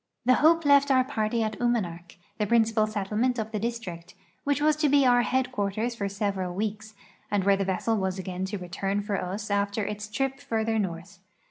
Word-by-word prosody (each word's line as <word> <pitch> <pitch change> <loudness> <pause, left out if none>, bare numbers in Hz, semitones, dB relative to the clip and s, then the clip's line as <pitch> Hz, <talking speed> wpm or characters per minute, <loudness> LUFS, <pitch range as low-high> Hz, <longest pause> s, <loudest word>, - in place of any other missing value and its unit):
The 255 - +6
Hope 330 +1 +5
left 280 0 +5
our 260 -1 +5
party 225 -3 -1
at 215 0 -3
Unianak, 180 -8 -1 0.2
the 210 - +1
princijial 225 -1 +3
settlement 215 +5 -1
of 220 -1 -3
the 215 - -2
district, 195 -7 -5 0.3
which 285 0 +1
was 305 +1 +3
to 305 -1 +2
be 280 -1 +4
our 245 -1 +5
headquarters 240 -3 -1
for 200 -3 -3
several 195 -3 -2
weeks, 215 +1 -4 0.3
and 205 -2 +1
where 200 +1 +4
the 195 0 -1
vessel 195 +4 0
was 190 -1 -1
again 185 0 -4
to 205 +2 -4
return 195 +3 -3
for 205 -2 -2
us 200 +3 -4
after 200 +1 0
its 210 +1 -5
trip 270 +5 -2
further 225 -5 -1
north. 180 0 -5
215 Hz, 195 wpm, -27 LUFS, 195-240 Hz, 0.3 s, The